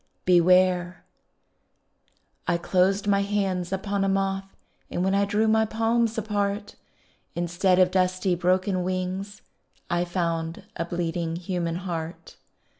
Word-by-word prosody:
BEWARE 180 0 +3 1.4
I 170 - +2
closed 190 +3 +1
my 200 -1 +3
hands 195 -3 -1
upon 195 +1 -1
a 195 - +1
moth 195 0 -1 0.4
And 175 - -2
when 190 +1 +1
I 200 0 +3
drew 210 +2 +1
my 220 0 +4
palms 225 +1 0
apart, 205 -1 -2 0.6
Instead 175 +2 +1
of 185 -1 +4
dusty, 185 0 +1
broken 185 +2 +1
wings 185 +2 -3 0.5
I 175 0 +2
found 170 -2 -2
a 170 - -2
bleeding 170 -1 -2
human 175 -1 -2
heart. 170 -2 -6
185 Hz, 120 wpm, -25 LUFS, 175-200 Hz, 1.4 s, my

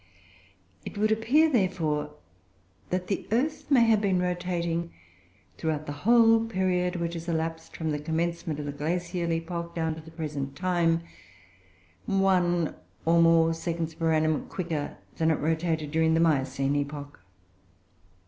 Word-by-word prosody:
It - - -8
would 215 +1 +2
appear, 245 +9 +4
therefore, 180 - 0 0.7
that 180 0 -1
the 195 - -3
earth 280 +8 0
may 260 -5 +6
have 225 -2 +4
been 190 -3 +2
rotating, 175 -2 -1 0.7
throughout 155 -1 -1
the 145 - -5
whole 225 +8 +5
period 185 -4 0
which 170 -1 -2
has 165 0 -6
elapsed 165 0 -3
from 160 -1 -2
the 150 - -2
commencement 165 0 -2
of 150 - -4
the 145 - -3
Glacial 170 +3 -2
epoch 170 +1 -3
down 160 -1 0
to 160 - -9
the 160 - -13
present 150 -4 -5
time, 170 -2 +1 1.0
one, 180 -4 +2 0.3
or 170 +1 +4
more, 165 0 +5
seconds 165 -1 -3
per 165 0 0
annum 155 -1 +1
quicker 165 -5 -4 0.2
than 160 0 +2
it 160 - +3
rotated 160 -1 -1
during 160 0 +3
the - - +3
Miocene 140 -3 +1
epoch. 145 0 -5
165 Hz, 145 wpm, -27 LUFS, 160-180 Hz, 1.0 s, may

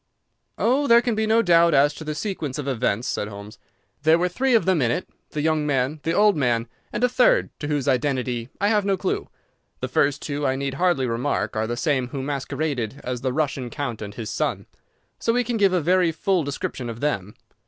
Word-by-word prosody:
"Oh, 270 +5 +2
there 235 -1 +6
can 240 - 0
be 220 0 0
no 225 +1 +4
doubt 170 -2 +5
as 145 +2 +4
to 160 - -9
the 155 0 -4
sequence 155 -7 -3
of 145 -2 -4
events," 125 -2 0
said 105 - -2
Holmes. 105 +1 -10 0.4
"There 160 +2 +5
were 180 +1 +1
three 255 +7 +1
of 225 - +3
them 185 -5 +2
in 120 - +2
it: 120 - -2 0.2
the 150 - -3
young 155 -1 +1
man, 135 +2 0
the 165 - -1
old 210 +1 +4
man, 120 -5 +1 0.2
and - - -3
a - - +6
third, 250 0 +3
to 145 - -4
whose 145 -3 -1
identity 125 -3 0
I 205 - +2
have 210 -2 +2
no 195 -1 +1
clue. 185 0 -2 0.5
The - - -3
first 140 0 +1
two, 145 0 -3
I 130 - +1
need 135 0 -3
hardly 150 -3 +1
remark, 120 +3 -1
are 110 0 0
the 120 +1 -3
same 135 -4 0
who 135 +1 -5
masqueraded 140 -3 -3
as 125 -1 -4
the 130 -1 -1
Russian 135 -3 -1
count 120 -5 -4
and 100 -1 -7
his 115 -3 -5
son, - - -2 0.5
so 230 - +1
we 245 +1 +2
can 240 -1 -2
give 200 -3 +4
a 185 - +2
very 180 +1 +3
full 185 +1 0
description 135 -3 -4
of 115 0 -6
them. 105 -8 -2
145 Hz, 225 wpm, -23 LUFS, 125-180 Hz, 0.5 s, there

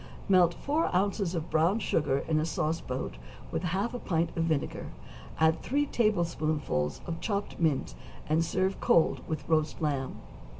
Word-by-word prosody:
= - - -15
Melt 180 -3 +5
four 300 +3 0
ounces 195 -1 +1
of 165 0 -4
brown 165 +6 +3
sugar 145 -10 0
in 155 -1 +2
a - - +1
sauce 160 0 -1
boat 125 - -4 0.3
with - - -1
half 195 +8 -1
a 245 - -3
pint 165 -5 -1
of 165 - +1
vinegar, 155 -4 -1 0.5
add 160 0 +3
three 290 +3 +1
tablespoonfuls 155 - 0
of 165 -1 -4
chopped 205 -2 -2
mint, 150 - +1 0.3
and 155 +2 +3
serve 185 +3 0
cold 165 - +3
with 155 - -4
roast 155 -1 +1
lamb. 140 -5 -1
165 Hz, 165 wpm, -29 LUFS, 155-190 Hz, 0.5 s, Melt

